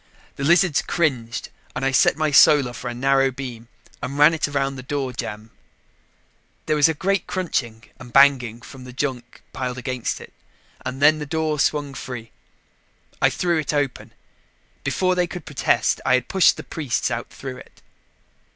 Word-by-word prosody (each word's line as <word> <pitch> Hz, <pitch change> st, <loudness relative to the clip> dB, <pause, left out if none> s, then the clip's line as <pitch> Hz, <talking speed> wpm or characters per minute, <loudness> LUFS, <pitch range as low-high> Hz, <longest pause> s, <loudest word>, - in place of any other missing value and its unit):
The 140 Hz, -, -5 dB
lizards 175 Hz, 0 st, +4 dB
cringed 125 Hz, -8 st, -1 dB, 0.3 s
and 130 Hz, -, -2 dB
I 135 Hz, -, +2 dB
set 135 Hz, -, +4 dB
my 155 Hz, -1 st, 0 dB
Solar 140 Hz, -3 st, +6 dB
for 125 Hz, -, -6 dB
a -, -, -4 dB
narrow 135 Hz, +1 st, +3 dB
beam 125 Hz, -3 st, -8 dB, 0.3 s
and 140 Hz, +1 st, -4 dB
ran 150 Hz, +3 st, +6 dB
it 160 Hz, -, 0 dB
around 135 Hz, -1 st, -1 dB
the 130 Hz, -, -7 dB
door 135 Hz, -1 st, -3 dB
jamb. 110 Hz, -1 st, -6 dB, 1.1 s
There 155 Hz, -, +1 dB
was 150 Hz, +1 st, +5 dB
a 160 Hz, -, -1 dB
great 195 Hz, +3 st, 0 dB
crunching 120 Hz, -11 st, -2 dB, 0.2 s
and 125 Hz, -2 st, -11 dB
banging 125 Hz, -4 st, +4 dB
from 130 Hz, 0 st, -11 dB
the 125 Hz, 0 st, -10 dB
junk 125 Hz, -3 st, -4 dB
piled 125 Hz, -1 st, -4 dB
against 125 Hz, -1 st, -3 dB
it, -, -, -13 dB, 0.5 s
and 130 Hz, +2 st, -4 dB
then 155 Hz, +1 st, +6 dB
the 150 Hz, -, -5 dB
door 155 Hz, 0 st, -1 dB
swung 145 Hz, 0 st, 0 dB
free. 120 Hz, -4 st, -7 dB, 0.9 s
I -, -, +5 dB
threw 175 Hz, -2 st, 0 dB
it 150 Hz, 0 st, -2 dB
open. 145 Hz, -3 st, -2 dB, 0.7 s
Before 185 Hz, -1 st, +1 dB
they 180 Hz, -1 st, +1 dB
could 175 Hz, -2 st, -8 dB
protest, -, -, +1 dB
I 130 Hz, -, +4 dB
had 125 Hz, -1 st, -1 dB
pushed 190 Hz, -2 st, +4 dB
the -, -, -7 dB
priests 140 Hz, -5 st, -2 dB
out 120 Hz, -1 st, -4 dB
through 130 Hz, -2 st, -8 dB
it. -, -, -16 dB
135 Hz, 175 wpm, -22 LUFS, 125-150 Hz, 1.1 s, Solar